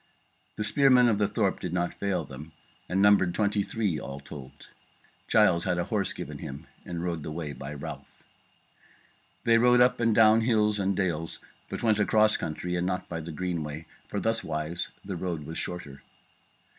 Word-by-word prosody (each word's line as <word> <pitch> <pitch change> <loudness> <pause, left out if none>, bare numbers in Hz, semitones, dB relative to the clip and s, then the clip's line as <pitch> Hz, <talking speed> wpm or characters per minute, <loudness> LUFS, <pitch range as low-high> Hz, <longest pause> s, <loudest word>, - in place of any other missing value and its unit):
The 105 - -2
spearmen 125 +1 +5
of 105 -3 +2
the 105 - +3
thorp 100 -2 0
did 90 -2 -4
not 90 -1 0
fail 100 -2 -2
them, 75 +4 -10 0.4
and 95 +3 +2
numbered 100 -4 +5
twenty 105 0 +1
and - - -6
three 100 -9 -1
all 70 +1 -7
told. 70 -2 -11 0.6
Giles 95 -6 +4
had 90 -2 0
a 85 - +1
horse 100 +1 -1
given - - -7
him 70 +1 -7 0.2
and 85 -1 -4
rode 85 -3 -2
the 75 - -6
way 75 -2 -4
by 70 +2 -7
Ralph. 70 - -7 1.3
They 115 0 +5
rode 125 +1 +5
up 125 +1 +4
and 115 -2 +2
down 110 0 +6
the 110 - -1
hills 105 -3 +2
and 95 -1 0
dales, 80 -4 -1 0.3
but - - -5
went 110 -2 +3
across 110 +1 +4
country 90 +3 -3
and 90 +1 0
not 90 -1 -3
by 85 -1 -4
the 80 +1 -7
Greenway, 80 -2 -4 0.2
for - - -3
thuswise 85 -6 -1 0.2
the 95 -1 -4
road 85 -4 -3
was 80 +2 -5
shorter. 75 -6 -6
90 Hz, 185 wpm, -28 LUFS, 80-105 Hz, 1.3 s, down